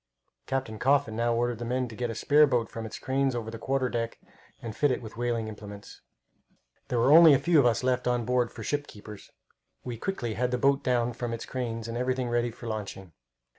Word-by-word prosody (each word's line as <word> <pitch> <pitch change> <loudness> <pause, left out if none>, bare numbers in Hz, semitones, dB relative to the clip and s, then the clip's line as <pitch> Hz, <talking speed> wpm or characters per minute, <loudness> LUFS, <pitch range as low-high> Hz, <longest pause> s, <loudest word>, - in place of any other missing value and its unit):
Captain 130 -5 -3
Coffin 135 -4 +2
now 120 +1 +1
ordered 120 -1 -1
the - - -4
men 125 +2 -1
to 115 - -10
get 120 +1 -2
a 115 - -4
spare 150 +5 +5
boat 120 -4 0
from 115 -1 -5
its - - -8
cranes 135 -1 0
over 110 -2 -4
the 115 - -8
quarter 135 +1 0
deck 115 -1 -3 0.4
and 115 -2 -7
fit 145 +5 +2
it 125 - 0
with 110 -2 -10
whaling 120 -1 -1
implements. 105 -1 -10 0.9
There 125 - -1
were 120 +4 +4
only 160 -2 +9
a - - +4
few 170 +2 +3
of 130 - +5
us 120 +1 +1
left 125 -1 0
on 120 -1 +1
board 125 -1 +1
for - - -9
ship 145 0 -2
keepers. 105 0 -12 0.5
We 120 -2 -5
quickly 120 - -3
had 125 +3 0
the 125 - 0
boat 140 +2 +2
down 120 -2 +1
from 120 -1 -4
its 115 - -5
cranes, 115 -3 -4
and 115 - -5
everything 125 0 -1
ready 120 0 +1
for 120 +1 -12
launching. 100 -5 -6
120 Hz, 225 wpm, -28 LUFS, 115-130 Hz, 0.9 s, only